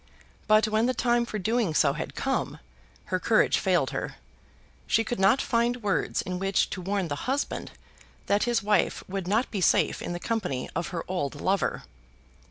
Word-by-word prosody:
But 215 0 +5
when 215 +2 +2
the 255 - 0
time 240 0 +1
for 215 - -4
doing 215 -4 0
so 140 - +4
had 155 - -6
come, 270 -1 -1 0.6
her - - +2
courage - - +3
failed - - +1
her. - - -4 0.7
She 225 - +3
could 235 0 -3
not 200 +8 +4
find 235 0 0
words 200 -2 0
in 180 0 -4
which 195 +1 +1
to 185 - -4
warn 195 0 -1
the 145 - -4
husband 275 +2 -2 0.5
that 205 +2 +2
his 240 -4 +1
wife 210 -3 +1
would 190 -1 -4
not 220 +6 +1
be 200 - -2
safe - - +3
in - - -4
the 175 - -4
company 180 - -2
of 170 +2 -1
her 170 -2 -4
old 145 -6 -3
lover. 195 +3 0
205 Hz, 180 wpm, -27 LUFS, 180-235 Hz, 0.7 s, But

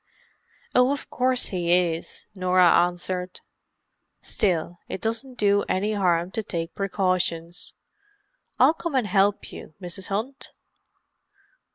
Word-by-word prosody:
"Oh, 250 +2 +5
of 285 - -4
course 255 0 +1
he 175 -3 -1
is," 175 -2 +1
Norah 185 -2 +4
answered. 180 +1 0 0.8
"Still, 175 -3 -1
it - - -4
doesn't 230 +5 -3
do 205 -1 +3
any 205 +3 +1
harm 180 -3 +1
to 220 - -2
take 170 -5 -4
precautions. 180 -3 -1 0.8
I'll - - +6
come 335 -3 -4
and 255 -4 +2
help 200 +1 +2
you, 155 - -10
Mrs. 185 0 -7
Hunt." 225 +8 -4
185 Hz, 115 wpm, -25 LUFS, 175-215 Hz, 0.8 s, I'll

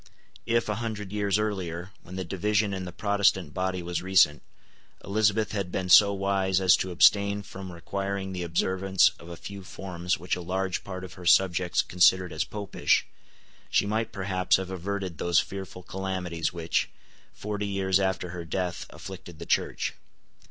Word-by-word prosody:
If, 115 0 +2
a 105 - 0
hundred 105 -4 -4
years 105 -1 +1
earlier, 95 -4 -3
when 90 - -10
the 95 - -3
division 100 +3 0
in 95 -1 -4
the 90 - -6
Protestant 100 -5 +1
body 95 -1 -2
was 85 -1 -2
recent, 90 -5 +4 0.6
Elizabeth 105 +1 +2
had 100 -4 -3
been 90 0 -2
so 100 +3 +8
wise 95 -1 +1
as 95 -2 +6
to 95 - -2
abstain 100 +3 +4
from 95 -1 -8
requiring 95 +2 -4
the 90 -1 -4
observance 95 +3 +2
of 85 - -12
a 85 - -7
few 100 +3 -8
forms 90 -1 -3
which 90 +3 -2
a 90 - -6
large 95 +1 -2
part 95 -1 -6
of 90 -4 -8
her 90 - -11
subjects 90 -1 +4
considered 90 0 +3
as 80 - 0
Popish, 105 -2 0 0.6
she - - +3
might 110 +2 -1
perhaps 95 -2 +1
have 95 0 -5
averted 95 -2 -4
those 85 -1 +3
fearful 95 -2 -6
calamities 90 -4 -3
which, 85 -1 -1 0.4
forty 105 0 -4
years 95 -1 +1
after 95 -2 -1
her 85 0 -6
death, 90 +2 -3
afflicted 90 -3 -10
the - - -8
Church. - - 0
95 Hz, 165 wpm, -27 LUFS, 90-100 Hz, 0.6 s, so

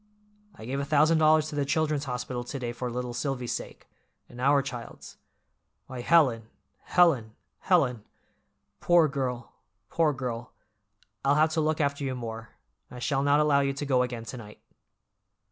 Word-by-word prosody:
I 110 - -11
gave 135 +3 -3
a - - -1
thousand 155 +3 +3
dollars 155 0 +4
to 150 - -7
the 145 - +1
Children's 150 0 0
Hospital 125 -1 -4
to 120 +3 -6
day 120 -3 -4
for 125 +1 -5
little 125 0 -4
Silvy's 125 -1 -3
sake—and 120 - -10
our 140 +1 +4
child's. 125 -4 -9 0.7
Why, 130 -2 -7
Helen, 125 -8 +3 0.4
Helen, 135 -12 +3 0.2
Helen! 130 - +1 0.8
Poor 175 -2 +4
girl, 130 -4 -4 0.4
poor 165 -2 +2
girl, 125 -3 -5 0.7
I'll 140 +1 +3
have 155 +1 +3
to 160 - 0
look 155 0 0
after 140 -1 0
you 130 -2 -2
more, 115 -2 -7 0.4
I 125 - -10
shall 135 +3 -1
not 145 +1 +3
allow 150 -2 +3
you 140 0 0
to 140 +2 -5
go 130 -3 +2
again 120 -2 -3
to 115 +3 -7
night." 105 -3 -12
135 Hz, 160 wpm, -27 LUFS, 120-150 Hz, 0.8 s, dollars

